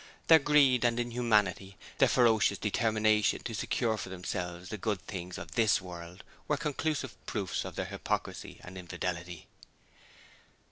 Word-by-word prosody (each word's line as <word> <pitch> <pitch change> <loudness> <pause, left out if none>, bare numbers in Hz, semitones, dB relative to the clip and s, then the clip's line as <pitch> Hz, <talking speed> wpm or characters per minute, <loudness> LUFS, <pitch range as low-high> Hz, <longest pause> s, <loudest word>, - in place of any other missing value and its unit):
Their 160 -1 +9
greed 140 -4 +4
and 120 0 +2
inhumanity 105 -6 +1 0.2
their - - +6
ferocious 115 -3 +3
determination 110 0 +2
to - - -4
secure 110 -2 0
for 95 - -6
themselves 90 -1 -5
the 110 - -4
good 105 -1 -1
things 90 -2 -6
of 85 +1 -8
THIS 110 -1 +3
world 90 0 -9 0.2
were 150 - +1
conclusive 150 -2 -2
proofs 100 -5 -2
of - - -7
their - - -2
hypocrisy - - -4
and 95 +1 -9
infidelity. 90 -1 -5
105 Hz, 140 wpm, -31 LUFS, 90-120 Hz, 0.2 s, Their